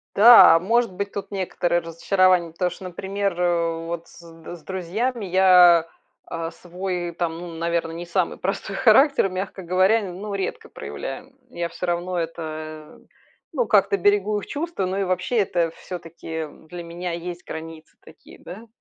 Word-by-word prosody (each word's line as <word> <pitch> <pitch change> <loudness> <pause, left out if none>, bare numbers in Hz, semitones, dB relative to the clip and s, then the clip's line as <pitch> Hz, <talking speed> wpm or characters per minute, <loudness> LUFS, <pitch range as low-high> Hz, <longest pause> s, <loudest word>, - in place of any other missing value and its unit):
Да, 215 -6 +9
может 230 +3 +1
быть 200 +2 -3
тут 200 0 -6
некоторые 175 -2 0
разочарования, 175 +1 +2
потому 180 +2 -1
что, 180 +2 -10
например, 195 +2 -3
э, 170 -2 0
вот 170 0 -5
с - - -16
д 165 0 -11
с 170 - -13
друзьями 205 +7 -3
я, 180 -3 +6 0.4
а, 165 0 -5
свой, 180 +1 -5
там, 165 -1 -3
ну, 175 - -7
наверно, 170 0 -1
не 170 +1 -7
самый 175 +1 -1
простой 195 +1 -3
характер, 265 0 +5
мягко 190 +1 -5
говоря, 185 +5 +3
ну, 200 +4 -7
редко 450 - -4
проявляем. 270 - -8
Я 170 -7 -3
всё 180 - -5
равно 175 +1 -2
это, 155 -2 -6 0.5
ну, 250 -7 0
как-то 200 -3 +3
берегу 205 +2 +2
их - - -7
чувства, 305 - -3
но 190 +2 -2
и 200 - 0
вообще, 185 +6 -1
это 175 -5 +1
всё-таки, 170 -3 -9
м, 160 -1 -6
для 175 +1 -7
меня 175 +1 -5
есть 175 +1 -6
границы 160 0 -9
такие, - - -17
да. 215 +6 -11
180 Hz, 165 wpm, -23 LUFS, 170-195 Hz, 0.5 s, Да